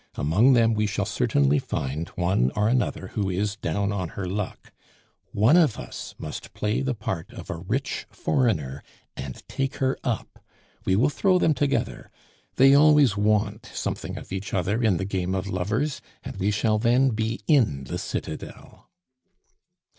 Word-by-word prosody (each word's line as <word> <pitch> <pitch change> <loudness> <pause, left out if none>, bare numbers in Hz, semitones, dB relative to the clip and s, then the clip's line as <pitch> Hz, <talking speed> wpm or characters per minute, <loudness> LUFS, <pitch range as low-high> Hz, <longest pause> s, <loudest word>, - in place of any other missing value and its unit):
Among 100 - +4
them 115 -2 +4
we 105 -1 +1
shall 105 - -1
certainly 70 +1 +2
find 70 +5 -3
one 90 -8 +2
or 105 0 +2
another 120 -5 0
who 100 -3 -2
is 100 +3 -1
down 100 +1 -1
on 95 -4 -2
her 100 - -2
luck; 100 +2 -5 0.6
one 110 +10 +4
of 160 -9 +4
us - - -8
must - - -7
play 105 +1 0
the 135 -2 -1
part 95 -5 -4
of - - -7
a 85 - -4
rich 115 +11 -3
foreigner 80 - 0 0.3
and - - -8
take 135 0 -2
her 130 0 0
up. 120 -3 -4 0.4
We 95 - +3
will 130 +9 +3
throw 185 +4 +3
them 165 -3 +3
together. 140 0 -1 0.5
They 135 +1 +6
always 145 -6 +6
want 105 +1 +1
something - - -3
of - - -10
each 95 +1 -4
other 95 +6 0
in 110 -7 +3
the 95 - -2
game 95 -1 -2
of 95 0 -2
lovers, 105 +10 -1 0.2
and - - -7
we 100 - +1
shall 105 +1 +1
then 125 +4 +4
be 110 0 -2
in 110 - +3
the 65 - -5
citadel." - - -7
105 Hz, 165 wpm, -25 LUFS, 95-125 Hz, 0.6 s, They